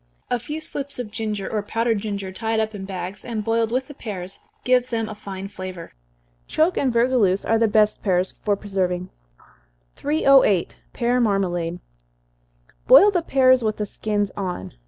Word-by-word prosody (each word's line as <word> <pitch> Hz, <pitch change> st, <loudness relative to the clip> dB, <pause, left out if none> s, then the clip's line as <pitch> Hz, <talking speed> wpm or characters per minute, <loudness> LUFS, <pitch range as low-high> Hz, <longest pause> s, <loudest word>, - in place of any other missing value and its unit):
A 245 Hz, -, +1 dB
few 300 Hz, +7 st, -5 dB
slips 285 Hz, -3 st, -3 dB
of 240 Hz, -4 st, -5 dB
ginger, 210 Hz, -3 st, -3 dB
or 215 Hz, -, -1 dB
powdered 225 Hz, +1 st, 0 dB
ginger, 200 Hz, -2 st, -4 dB
tied 220 Hz, +3 st, -1 dB
up 220 Hz, 0 st, -1 dB
in 195 Hz, -2 st, -6 dB
bags, 190 Hz, 0 st, -6 dB
and 225 Hz, -3 st, -4 dB
boiled 225 Hz, +1 st, +1 dB
with 255 Hz, +2 st, 0 dB
the 290 Hz, -, -10 dB
pears, 195 Hz, -8 st, -6 dB, 0.2 s
gives 250 Hz, -1 st, +3 dB
them 225 Hz, -3 st, -2 dB
a 215 Hz, -, -6 dB
fine 195 Hz, -2 st, -7 dB
flavor. 185 Hz, -3 st, -8 dB, 0.5 s
Choke 330 Hz, +4 st, +2 dB
and 265 Hz, -, +1 dB
vergouleuse 235 Hz, -5 st, +2 dB
are 225 Hz, 0 st, +2 dB
the 225 Hz, -, +4 dB
best 210 Hz, 0 st, +2 dB
pears 185 Hz, -2 st, +1 dB
for 205 Hz, -1 st, +2 dB
preserving. 185 Hz, -3 st, -2 dB, 0.9 s
308. 275 Hz, -, +3 dB, 0.2 s
Pear 245 Hz, 0 st, +1 dB
Marmalade. 175 Hz, -6 st, 0 dB, 1.1 s
Boil 410 Hz, +1 st, +8 dB
the 355 Hz, -3 st, +1 dB
pears 260 Hz, -5 st, +4 dB
with 215 Hz, -1 st, -1 dB
the 210 Hz, -, -2 dB
skins 205 Hz, -1 st, -2 dB
on. 180 Hz, -, -4 dB
215 Hz, 165 wpm, -23 LUFS, 195-245 Hz, 1.1 s, Boil